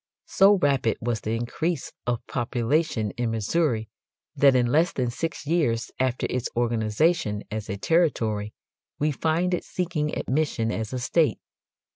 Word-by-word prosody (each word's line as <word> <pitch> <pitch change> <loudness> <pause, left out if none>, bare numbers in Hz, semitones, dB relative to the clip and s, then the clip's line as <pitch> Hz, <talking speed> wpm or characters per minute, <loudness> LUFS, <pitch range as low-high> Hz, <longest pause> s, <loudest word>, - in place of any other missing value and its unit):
So 200 +2 +5
rapid 140 -9 +1
was 120 -2 -2
the 110 +1 -2
increase 140 +7 -2
of 120 -1 -1
population 120 -1 0
in 120 -1 0
Missouri 115 +1 0 0.5
that 140 -2 +5
in 125 -1 +4
less 160 +9 +3
than 125 -2 -1
six 160 +5 -4
years 145 -8 0
after 130 -1 0
its 125 -1 -2
organization 115 +1 +1
as 110 -1 -4
a 100 - -3
territory 110 - +1 0.5
we 150 +1 +1
find 165 +5 0
it 180 - -1
seeking 165 -4 -2
admission 130 -5 0
as 110 0 -3
a 130 - -2
state. 145 +6 +2
125 Hz, 145 wpm, -25 LUFS, 115-160 Hz, 0.5 s, So